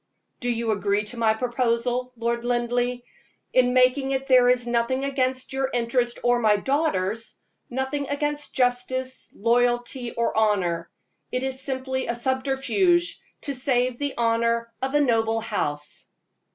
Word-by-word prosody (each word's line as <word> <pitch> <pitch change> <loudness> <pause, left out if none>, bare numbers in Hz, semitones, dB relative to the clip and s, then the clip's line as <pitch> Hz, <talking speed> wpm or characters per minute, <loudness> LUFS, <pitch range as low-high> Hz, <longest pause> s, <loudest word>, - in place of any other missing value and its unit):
Do 245 - -2
you 230 -1 0
agree 205 0 +1
to 225 +3 -8
my 220 -1 +3
proposal, 245 +1 0
Lord 235 +1 -1
Linleigh? 245 0 0 0.5
In 250 -1 +4
making 255 +2 +4
it 270 0 -1
there 255 -2 +5
is 250 -1 +2
nothing 240 +2 0
against 260 -1 -1
your 265 0 0
interest 240 0 0
or 245 0 +3
my 215 -3 +4
daughter's 225 - -1 0.3
nothing 265 +3 -2
against 295 +1 -2
justice, 255 +1 -1
loyalty, 240 +2 +1
or 235 0 -1
honor; 185 -6 +1 0.4
it 250 +1 -1
is 265 0 -3
simply 260 -1 -2
a 235 - -1
subterfuge 270 +8 +1 0.2
to 285 - -2
save 250 -1 0
the 285 -1 -2
honor 230 0 +1
of 265 +2 -1
a - - +5
noble 225 -4 +2
house. 150 -10 -4
245 Hz, 140 wpm, -25 LUFS, 230-265 Hz, 0.5 s, there